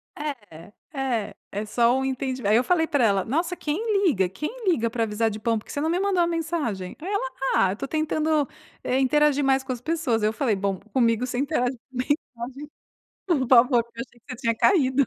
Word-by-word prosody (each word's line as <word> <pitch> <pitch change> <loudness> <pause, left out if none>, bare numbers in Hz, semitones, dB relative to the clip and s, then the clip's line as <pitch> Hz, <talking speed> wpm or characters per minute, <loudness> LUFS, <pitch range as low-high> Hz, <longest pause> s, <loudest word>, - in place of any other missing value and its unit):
É 210 - -7 0.2
é 235 -7 -2 0.2
é 205 +2 -3
só 235 +3 +2
o 265 - -1
entendi 260 -1 -3
aí 210 +2 +4
eu 245 - +4
falei 330 0 +2
pra 285 -6 +1
ela: 200 -4 +2
"Nossa, 335 +8 -1
quem 400 +6 0
liga? 190 - +2
Quem 300 - -4 0.2
liga 235 -10 +2
pra 230 0 -1
avisar 225 +1 0
de 215 0 -6
pão? 225 +1 +1
Porque 215 - -9
você 285 - -3
não 315 - 0
me 350 +2 +1
mandou 390 -3 +2
uma 340 - +3
mensagem?". 310 - -2
Aí 340 - -6
ela: 400 -10 -1 0.3
"Ah, 190 -1 +4
eu - - -3
tô 275 - -5
tentando, 310 -1 0 0.4
eh, 260 +1 +1
interagir 290 +2 +3
mais 270 0 +2
com 265 - -5
as 245 -2 -4
pessoas". 305 -7 0
Eu 210 0 +2
falei: 230 -5 +1
"Bom, 195 -1 -2
comigo 235 -1 +2
você 250 -1 -4
interage 270 -3 0
por 240 - -49
mensagem, 270 +4 +1 1.1
por 285 -9 +1
favor, 245 -1 +6
que 235 - -26
eu 235 - -1
achei 240 -1 -25
que - - -47
você 255 - -6
tinha 230 -1 0
caído". 265 - +3
260 Hz, 225 wpm, -25 LUFS, 225-305 Hz, 1.1 s, favor